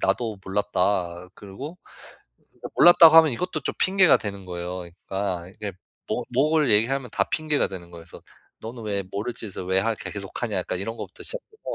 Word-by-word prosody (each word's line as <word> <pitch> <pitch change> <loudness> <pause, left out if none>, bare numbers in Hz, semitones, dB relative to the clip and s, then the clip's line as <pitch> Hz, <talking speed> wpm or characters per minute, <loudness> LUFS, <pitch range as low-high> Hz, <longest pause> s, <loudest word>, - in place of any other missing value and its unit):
나도 105 +2 0
몰랐다." 90 -2 -1
그리고 135 - -9
사실 - - -19 0.6
이거 - - -7
몰랐다고 165 -2 +8
하면 160 -3 +7
이것도 160 +5 -3
좀 - - -3
핑계가 190 -2 +5
되는 100 -2 -6
거예요. 90 0 -5 0.2
그러니까 95 -3 -3
이게 100 +1 -7 0.4
뭐 125 - -1
뭐를 150 +4 +2
얘기하면 120 +4 +2
다 - - +1
핑계가 155 -2 0
되는 85 -2 -9
거예요. 85 -1 -11
그래서 85 - -13 0.4
'너는 115 +1 -7
왜 100 -2 -1
모를 105 +4 -3
짓을 100 -4 -6
왜 95 +1 +2
하 115 +3 +1
계 - - -7
계속 100 -2 -7
하냐?' 110 -5 -1
약간 90 0 -2
이런 115 +4 -4
거부터 - - -9
시작해서 460 -3 -7
105 Hz, 410 characters per minute, -24 LUFS, 95-135 Hz, 0.6 s, 몰랐다고